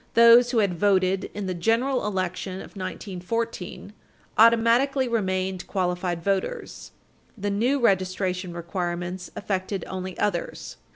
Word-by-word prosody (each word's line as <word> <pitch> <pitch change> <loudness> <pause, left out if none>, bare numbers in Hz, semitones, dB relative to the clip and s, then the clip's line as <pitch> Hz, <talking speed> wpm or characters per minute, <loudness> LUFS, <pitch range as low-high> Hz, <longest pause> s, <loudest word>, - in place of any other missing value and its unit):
Those 235 +1 +8
who 240 - 0
had 195 -6 +1
voted 190 -1 +2
in 205 -1 -3
the 185 - -2
general 230 +7 +1
election 185 -1 -2
of 190 - -9
1914 195 +2 -4 0.4
automatically 235 +4 +4
remained 190 -5 -1
qualified 180 -2 -1
voters. 200 - -2 0.5
The 205 0 -2
new 245 +8 +1
registration 185 -4 0
requirements 175 +1 -4
affected 195 -1 -3
only 185 0 -5
others. 175 -5 -2
190 Hz, 115 wpm, -25 LUFS, 185-230 Hz, 0.5 s, Those